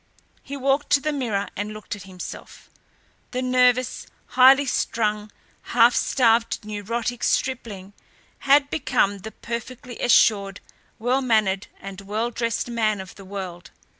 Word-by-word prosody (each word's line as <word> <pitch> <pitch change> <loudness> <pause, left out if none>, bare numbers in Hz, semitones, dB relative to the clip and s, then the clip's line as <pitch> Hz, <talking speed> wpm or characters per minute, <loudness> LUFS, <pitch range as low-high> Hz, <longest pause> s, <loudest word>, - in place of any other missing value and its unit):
He 280 +1 -7
walked 275 +2 0
to 285 - +6
the 305 +2 -2
mirror 220 -8 -2
and 205 +2 -4
looked 215 0 -6
at 200 - -11
himself. 185 -1 -10 0.6
The 255 0 -3
nervous, 255 0 +2 0.2
highly 265 +2 +6
strung, 215 -4 -1 0.5
half 235 +2 +7
starved, 230 -3 +2
neurotic 230 +3 -3
stripling 210 -7 -2 0.6
had 280 0 +5
become 225 -8 +1
the 220 +3 -8
perfectly 235 +2 -7
assured, 200 -5 +3 0.4
well 250 +4 +1
mannered, 215 -6 +1
and 195 0 -8
well 215 +4 -2
dressed 230 0 -2
man 220 -3 0
of 190 -1 -8
the 195 - -13
world. 185 -3 -7
230 Hz, 135 wpm, -23 LUFS, 205-255 Hz, 0.6 s, half